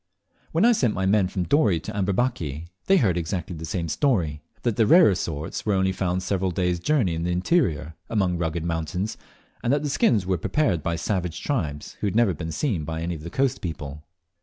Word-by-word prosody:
When 165 +7 +3
I 240 - +7
sent 125 - +2
my 95 - 0
men 100 -1 +3
from 90 0 -2
Dorey 105 - +3
to 110 - -7
Amberbaki, 95 - -1 0.2
they 195 - +6
heard 95 - +2
exactly 85 +1 -3
the 80 0 -6
same 85 +1 -2
story 85 - 0 0.2
that 120 -4 +1
the 110 -1 +3
rarer 165 - +7
sorts 80 -2 -4
were 105 -2 +1
only 95 0 +2
found 95 -1 -1
several 95 0 0
days' 90 0 0
journey 120 - +1
in 80 - -3
the 85 - -1
interior, 90 - +1 0.2
among 95 -6 +1
rugged 80 -1 -1
mountains, 85 +5 -2 0.5
and 120 - +1
that 145 +1 +2
the 145 - -1
skins 115 -8 +3
were 90 -2 0
prepared 95 - +1
by 85 +3 -1
savage 90 -1 -2
tribes 75 - -3
who - - 0
had 100 - -2
never 115 -3 +4
even 85 - -6
been - - -4
seen 100 - -1
by 80 +1 -4
any 85 +1 -2
of 80 - -7
the 85 - -7
coast 135 +5 0
people. 75 -3 -6
90 Hz, 215 wpm, -25 LUFS, 80-110 Hz, 0.5 s, I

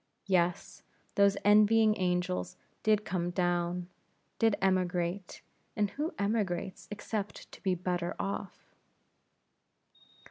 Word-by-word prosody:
Yes, 180 -3 0 0.3
those 200 0 +4
envying 215 +1 +6
angels 180 -1 -1 0.2
did 215 -1 +2
come 175 -3 -1
down; 175 0 0 0.5
did 225 -2 +4
emigrate; 185 -1 -1 0.3
and 205 -2 +1
who 305 +3 -2
emigrates 200 -3 -2
except 210 0 -5
to - - -13
be 190 -2 +1
better 175 0 -2
off? 195 0 -5
190 Hz, 100 wpm, -31 LUFS, 180-205 Hz, 0.5 s, envying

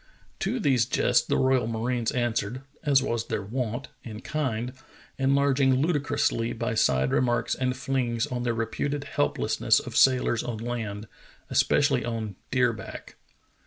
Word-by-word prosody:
To 230 +6 -1
these 130 - +2
jests - - +2
the - - +1
royal 130 -3 +2
marines 115 +1 -1
answered, 120 0 -1 0.2
as 140 -4 +4
was 115 -3 -2
their 100 - -2
wont, 120 +4 -3
in 110 -2 -8
kind, 125 -5 -2 0.5
enlarging 135 0 +3
ludicrously 140 -5 0
by 115 +1 -2
side 65 -11 +2
remarks 120 -1 +1
and 130 0 -1
flings 125 -4 -1
on 125 -1 -4
the 120 -1 -1
reputed 140 +6 -2
helplessness - - +1
of - - -8
sailors 125 -3 +4
on 120 -2 -4
land, 110 -2 -4 0.4
especially 140 -4 +3
on 115 -4 -4
deer 125 -2 +2
back. 100 -3 -9
120 Hz, 140 wpm, -26 LUFS, 115-135 Hz, 0.5 s, as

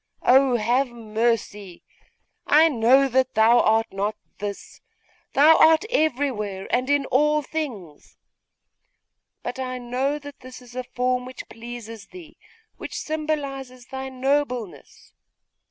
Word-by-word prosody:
Oh, 260 0 +5
have 240 +4 +1
mercy! 220 -5 -3 0.6
I 315 +2 +6
know 265 +1 +4
that 260 0 0
thou 225 +2 +5
art 225 0 +3
not 205 +2 -2 0.2
this! 205 -1 -7 0.5
Thou 305 +4 +6
art 320 +4 +5
everywhere 250 - -1
and 255 +2 0
in 285 -1 +2
all 300 +4 +2
things! 235 - -7 1.3
But 250 - -5
I 255 -1 -3
know 255 +4 -2
that 285 -1 -11
this 255 0 -11
is 245 -1 -16
a 255 - -3
form 250 0 -1
which 255 0 -9
pleases 230 -3 -9
thee, 340 -4 -14 0.4
which - - -8
symbolises 280 -5 -4
thy 265 0 -5
nobleness! 260 -5 -3
255 Hz, 120 wpm, -23 LUFS, 230-280 Hz, 1.3 s, I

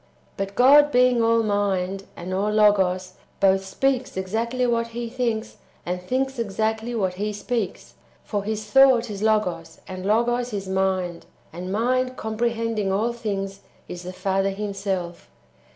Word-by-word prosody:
5. - - -34
But 195 0 -4
God 290 +4 +6
being 250 -1 +4
all 230 0 +3
Mind, 195 -2 -1
and 180 +2 -6
all 200 +3 0
Logos, 190 -4 +3 0.3
both 195 -1 +3
speaks 255 +4 -1
exactly 230 +6 -1
what 235 -1 +1
He 235 +1 -5
thinks, 230 -3 -2 0.3
and 180 +1 -3
thinks 265 +6 -2
exactly 220 +2 -1
what 190 -5 0
He 205 +3 -2
speaks. 210 -1 -4 0.3
For 205 -2 -3
His 215 +1 -3
thought 245 0 +5
is 200 -1 -6
Logos, 210 -7 0
and 185 -1 -7
Logos 240 +3 +1
is 195 -2 -4
Mind, 190 -2 -1 0.3
and 180 +2 -6
Mind 255 +4 0
comprehending 225 -2 -1
all 220 +5 0
things 195 -4 -4 0.3
is 175 - -7
the 180 +1 -6
Father 195 +1 0
Himself. 195 -3 -4
210 Hz, 150 wpm, -24 LUFS, 190-235 Hz, 0.3 s, God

